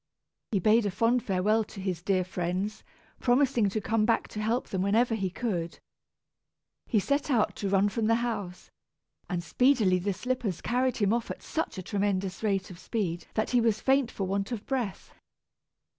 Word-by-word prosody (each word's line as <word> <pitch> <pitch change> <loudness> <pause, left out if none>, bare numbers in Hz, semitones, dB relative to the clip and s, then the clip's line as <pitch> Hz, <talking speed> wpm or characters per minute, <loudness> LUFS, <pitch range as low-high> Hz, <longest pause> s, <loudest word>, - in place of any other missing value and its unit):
He 210 - +2
bade 215 +3 +4
a - - +1
fond 230 +5 +2
farewell 205 +3 +1
to 200 - -11
his 185 -3 -3
dear 185 0 +1
friends, 185 +3 -3 0.4
promising 245 -4 +3
to 215 - -2
come 215 +1 +1
back 225 +1 +2
to 215 - -5
help 225 +3 0
them 190 - -1
whenever 225 +5 +2
he 195 -4 -1
could. 180 -5 -3 1.1
He 230 - +1
set 280 +8 0
out 235 -6 +2
to 200 - -2
run 195 +1 +3
from 215 +1 -1
the 230 - +4
house, 210 -7 -4 0.6
and 175 -2 -2
speedily 220 -3 +3
the 200 +2 -1
slippers 245 -5 -2
carried 250 +1 0
him 205 -1 +2
off 235 -1 -1
at - - -6
such 320 - -3
a 185 - -5
tremendous 195 -1 -1
rate 195 -3 0
of 175 - -11
speed 185 -3 -3
that 215 - 0
he 245 -1 +4
was 225 -2 +2
faint 265 -2 +2
for 195 - -3
want 195 +3 -2
of 225 -3 -4
breath. 245 -8 -3
210 Hz, 185 wpm, -28 LUFS, 190-235 Hz, 1.1 s, bade